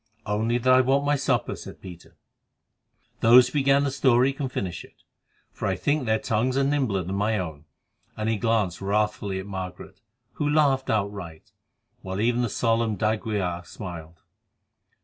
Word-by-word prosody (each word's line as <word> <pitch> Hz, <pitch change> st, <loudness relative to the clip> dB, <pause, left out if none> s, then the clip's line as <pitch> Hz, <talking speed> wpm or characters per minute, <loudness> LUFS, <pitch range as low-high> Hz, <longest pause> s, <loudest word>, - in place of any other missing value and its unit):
"Only 110 Hz, +3 st, 0 dB
that 130 Hz, +1 st, +3 dB
I 130 Hz, -, +6 dB
want 135 Hz, +2 st, +1 dB
my 145 Hz, 0 st, +3 dB
supper," 130 Hz, -5 st, 0 dB
said -, -, -10 dB
Peter. 90 Hz, -3 st, -12 dB, 1.0 s
"Those 120 Hz, +2 st, +7 dB
who -, -, -17 dB
began 140 Hz, -1 st, +3 dB
the 140 Hz, -, 0 dB
story 130 Hz, 0 st, +3 dB
can 135 Hz, -1 st, -4 dB
finish 95 Hz, -8 st, -4 dB
it, -, -, -20 dB, 0.5 s
for -, -, -4 dB
I -, -, 0 dB
think 145 Hz, -3 st, -1 dB
their 110 Hz, 0 st, +3 dB
tongues 115 Hz, +4 st, 0 dB
are 140 Hz, -, +3 dB
nimbler 135 Hz, -9 st, 0 dB
than 90 Hz, +3 st, -5 dB
my 105 Hz, +2 st, +1 dB
own," 80 Hz, -5 st, -5 dB, 0.5 s
and 110 Hz, 0 st, -2 dB
he 110 Hz, -1 st, +1 dB
glanced 105 Hz, -5 st, 0 dB
wrathfully 105 Hz, -1 st, -1 dB
at 95 Hz, -, -5 dB
Margaret, 95 Hz, -2 st, -7 dB, 0.3 s
who 150 Hz, -1 st, -1 dB
laughed 140 Hz, -3 st, +2 dB
outright, 100 Hz, -6 st, -3 dB, 0.5 s
while 95 Hz, +1 st, -5 dB
even 120 Hz, +2 st, +1 dB
the 120 Hz, -, 0 dB
solemn 115 Hz, 0 st, 0 dB
d'Aguilar 105 Hz, -5 st, -1 dB
smiled. 85 Hz, -4 st, -9 dB
110 Hz, 165 wpm, -25 LUFS, 95-130 Hz, 1.0 s, Those